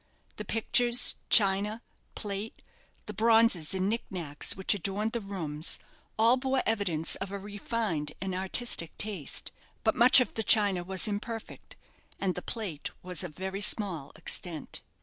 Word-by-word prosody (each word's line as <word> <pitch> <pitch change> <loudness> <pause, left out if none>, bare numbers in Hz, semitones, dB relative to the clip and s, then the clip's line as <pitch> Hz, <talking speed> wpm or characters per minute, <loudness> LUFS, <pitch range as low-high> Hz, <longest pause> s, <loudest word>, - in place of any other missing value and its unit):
The 210 - -6
pictures, 240 +3 +3 0.2
china, 205 +2 +4 0.3
plate, 205 +1 -5 0.4
the - - -5
bronzes 225 -7 +3
and 190 0 0
knick 230 +3 -1
knacks 155 -6 -2
which 190 - +2
adorned 205 +3 -2
the 235 -1 -3
rooms, 165 -6 -2 0.4
all 230 +3 +4
bore 265 0 0
evidence 195 -8 +1
of 195 - -5
a 200 - -5
refined 205 -6 -3
and 190 -1 -4
artistic 190 -1 +1
taste. 200 -9 -2 0.3
But - - +3
much 250 +2 +7
of 250 - 0
the 225 - -2
china 200 -5 +3
was 190 +2 +1
imperfect, 220 +2 -6 0.4
and 190 -2 0
the 180 - -6
plate 190 -11 -5
was 180 0 -3
of 165 -5 -8
very 190 +2 -5
small 190 -8 +1
extent. 165 -4 -5
200 Hz, 150 wpm, -29 LUFS, 180-225 Hz, 0.4 s, much